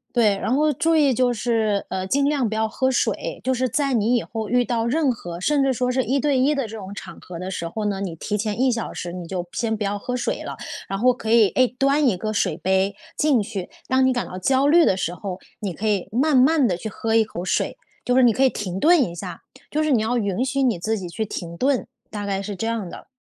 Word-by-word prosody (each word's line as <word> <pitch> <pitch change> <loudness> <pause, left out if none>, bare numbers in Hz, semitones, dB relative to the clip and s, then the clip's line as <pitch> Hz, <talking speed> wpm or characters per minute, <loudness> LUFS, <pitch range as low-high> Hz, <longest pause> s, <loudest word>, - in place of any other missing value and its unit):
对， 215 -4 +4
然 235 - -1
后 300 +3 +3
注 325 +4 +2
意 285 -4 +4
就 245 +1 +2
是， 220 -3 0
呃， 190 0 -2
尽 275 +7 +1
量 275 -6 +1
不 220 - -3
要 220 0 +1
喝 260 +4 0
水， 250 - -1
就 260 - +1
是 255 0 0
在 275 +2 0
你 235 +1 +2
以 230 - 0
后 220 -2 -5
遇 245 0 +3
到 230 -2 -1
任 275 +1 +2
何， 175 -6 -7
甚 285 +8 +2
至 270 - +2
说 250 0 0
是 260 0 +1
一 270 +3 0
对 280 -2 +1
一 285 +4 +3
的 275 -4 -1
这 220 +1 -8
种 195 0 -8
场 - - -9
合 175 -2 -9
的 185 +1 -5
时 170 -3 -4
候 215 +4 -4
呢， 200 -2 -1
你 180 -4 -4
提 210 +5 -2
前 210 0 -2
1 260 -1 +3
小 230 -1 -3
时 175 -1 -5
你 180 -2 -6
就 180 -2 -3
先 225 -1 -1
不 210 - -3
要 205 +1 -1
喝 250 +4 -3
水 245 - -2
了。 - - -6 0.3
然 195 - -2
后 250 +3 +4
可 225 -2 -5
以， 225 -3 +6
哎， 255 0 +3
端 275 +1 +3
一 195 - +1
个 215 +3 -3
水 205 - 0
杯 190 +1 +1 0.2
进 280 -8 +3
去， 200 -3 -5 0.2
当 260 0 +3
你 - - +4
感 245 - -2
到 185 - -7
焦 265 +8 +2
虑 330 +2 +6
的 190 - +3
时 175 -2 -2
候， 185 +1 -6 0.2
你 195 -5 -3
可 220 - -4
以 205 -4 0
慢 275 +6 +2
慢 270 +1 +5
地 180 -5 0
去 220 - -6
喝 225 +2 -2
一 225 - +6
口 180 -4 -6
水， 185 - -1 0.3
就 250 0 +1
是 260 - +6
你 240 -2 +6
可 260 - 0
以 265 - +6
停 190 -5 -4
顿 340 +2 +6
一 170 - -2
下， 175 - -7 0.3
就 305 +1 0
是 305 - +1
你 240 - +4
要 225 +3 0
允 205 0 0
许 270 +1 0
你 235 -8 +2
自 220 +5 -1
己 185 - -6
去 215 +6 -3
停 170 -3 -6
顿， 265 -1 +1 0.2
大 205 -1 -5
概 195 -1 -1
是 200 -1 -5
这 225 - -3
样 225 -5 -2
的。 - - -11
225 Hz, 290 characters per minute, -23 LUFS, 195-260 Hz, 0.3 s, 以